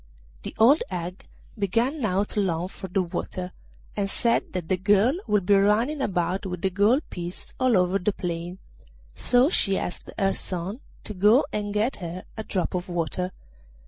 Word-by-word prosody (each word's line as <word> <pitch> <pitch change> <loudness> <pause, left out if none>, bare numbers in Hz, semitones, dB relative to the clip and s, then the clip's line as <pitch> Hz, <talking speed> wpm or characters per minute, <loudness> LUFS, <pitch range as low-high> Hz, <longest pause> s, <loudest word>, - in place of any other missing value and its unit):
The - - -7
old 255 +8 +6
hag 180 +1 -5 0.3
began 235 - 0
now 200 -3 +2
to 210 - -3
long 180 -2 0
for 190 - -8
the 185 +1 +1
water, 180 +1 -4 0.4
and 200 -1 -1
said 235 +3 +1
that 180 -3 -3
the 185 - +2
girl 205 +6 +4
would 210 -3 +2
be 205 - +4
running 215 +9 +3
about 185 -4 0
with 180 -2 -5
the 190 - +2
gold 210 - +3
piece 175 0 -7
all 255 -5 +4
over 180 +2 +2
the 200 +3 +1
plain, 175 -1 -4 0.6
so 245 - +4
she 195 - +2
asked 180 - -5
her 195 0 +2
son 185 +5 -3 0.2
to 215 - -5
go 210 +8 +5
and 205 -1 -2
get 215 +5 0
her 180 0 -6
a 220 - -5
drop 185 -4 -2
of 180 0 -3
water. 175 +2 -2
195 Hz, 175 wpm, -25 LUFS, 180-215 Hz, 0.6 s, old